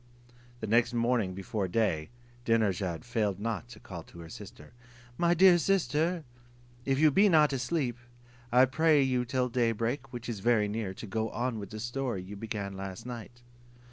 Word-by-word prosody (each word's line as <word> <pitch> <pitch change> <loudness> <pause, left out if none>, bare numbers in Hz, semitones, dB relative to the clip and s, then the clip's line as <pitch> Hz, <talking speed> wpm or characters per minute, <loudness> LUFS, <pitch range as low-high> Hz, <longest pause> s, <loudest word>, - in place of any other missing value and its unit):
The - - -2
next 120 +2 +2
morning 115 -5 +1
before 95 +1 -3
day, 90 -6 0 0.3
Dinarzade 100 -8 0
failed 105 -5 -1
not 115 +1 -3
to - - -12
call 85 -3 -8
to 85 - -14
her 85 - -10
sister: 105 +7 -11 0.4
"My 170 +5 +2
dear 180 0 +7
sister, 165 -1 +1 0.6
if 135 -1 +1
you 155 +1 +5
be 200 +8 +5
not 150 -4 +5
asleep, 130 -2 -1 0.5
I 125 +2 +7
pray 155 +2 +3
you 125 -2 +1
till 125 +1 0
day 120 -2 +1
break, 120 +5 -3
which 120 -1 -7
is 115 -4 -4
very 110 -1 +3
near, 105 -2 -3
to - - -8
go 110 +2 -2
on 120 -1 -2
with 100 - -7
the 110 - -7
story 120 -4 -3
you 100 +3 -8
began 100 -2 -4
last 95 +1 -7
night." 120 0 -8
120 Hz, 175 wpm, -30 LUFS, 105-130 Hz, 0.6 s, dear